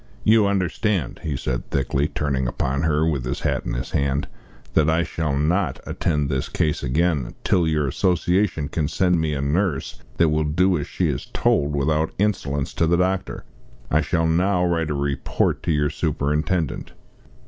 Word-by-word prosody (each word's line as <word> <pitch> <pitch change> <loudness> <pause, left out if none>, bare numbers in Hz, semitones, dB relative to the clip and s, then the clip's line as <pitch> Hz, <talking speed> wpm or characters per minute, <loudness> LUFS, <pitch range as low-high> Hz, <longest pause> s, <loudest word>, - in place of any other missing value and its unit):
"You 110 -1 +5
understand," 95 - -1
he 75 -4 -3
said 65 -1 -3
thickly, 70 +1 0
turning 70 -5 -1
upon 65 +3 -1
her, 80 0 +2
with 70 -6 -1
his 60 - -3
hat - - -1
in - - -2
his - - -4
hand, 70 0 0 0.5
"that 80 0 +3
I 80 +1 +2
shall 75 -4 -2
not 85 +7 0
attend 75 -4 -1
this 65 -2 -2
case 75 -2 0
again 75 -1 0
till 85 -3 +2
your 75 -2 +1
Association 90 -1 +1
can 75 -1 -1
send 90 0 +2
me 75 -2 -1
a 70 - -2
nurse 75 +1 -1 0.2
that 85 -1 +4
will 75 0 +1
do 90 +5 +2
as 70 - -4
she - - -1
is - - -3
told 75 +1 +1
without 75 +2 0
insolence 75 -9 -1
to 80 - +1
the 85 +1 +3
doctor. 95 +1 -1 0.5
I - - +4
shall 80 -1 0
now 90 +3 +2
write 85 -3 0
a 75 - -1
report 70 -1 -1
to - - -1
your 75 -1 +1
superintendent." 75 +1 -1
80 Hz, 175 wpm, -23 LUFS, 70-90 Hz, 0.5 s, You